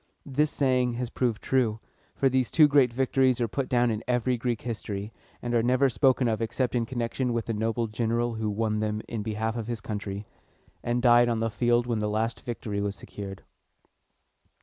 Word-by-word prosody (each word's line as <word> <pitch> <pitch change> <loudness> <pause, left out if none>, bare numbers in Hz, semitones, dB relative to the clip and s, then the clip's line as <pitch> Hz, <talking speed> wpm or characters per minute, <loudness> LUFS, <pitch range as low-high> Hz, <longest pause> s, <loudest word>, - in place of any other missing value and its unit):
This 145 +2 +1
saying 130 -4 +1
has 120 0 -4
proved 120 -4 -1
true; 120 -5 +1 0.4
for 135 - +2
these 130 -2 +1
two 155 -2 +6
great 140 -4 +4
victories 130 0 +2
are 120 - +1
put 130 +4 -3
down 120 -1 +3
in 110 0 -3
every 125 0 +1
Greek 120 -1 -2
history, 105 -2 -5 0.3
and 120 0 -2
are 120 - +4
never 130 +3 +3
spoken 130 0 +3
of 110 -1 0
except 120 +2 -1
in 120 -2 0
connection 120 0 -2
with 115 -1 -1
the 115 - -2
noble 115 +2 0
general 115 +2 -1
who 110 -1 -2
won 110 +1 -1
them 105 0 -2
in 115 - -4
behalf 110 +1 -2
of 115 -2 -4
his 120 -2 -3
country, 105 -1 -5 0.6
and 120 +1 -1
died 120 -1 +6
on 115 -1 0
the 115 0 -1
field 120 +1 +2
when 120 -3 -1
the 105 0 -1
last 110 +2 -1
victory 110 -4 -4
was 100 0 -2
secured. 100 -1 -8
120 Hz, 195 wpm, -27 LUFS, 110-125 Hz, 0.6 s, two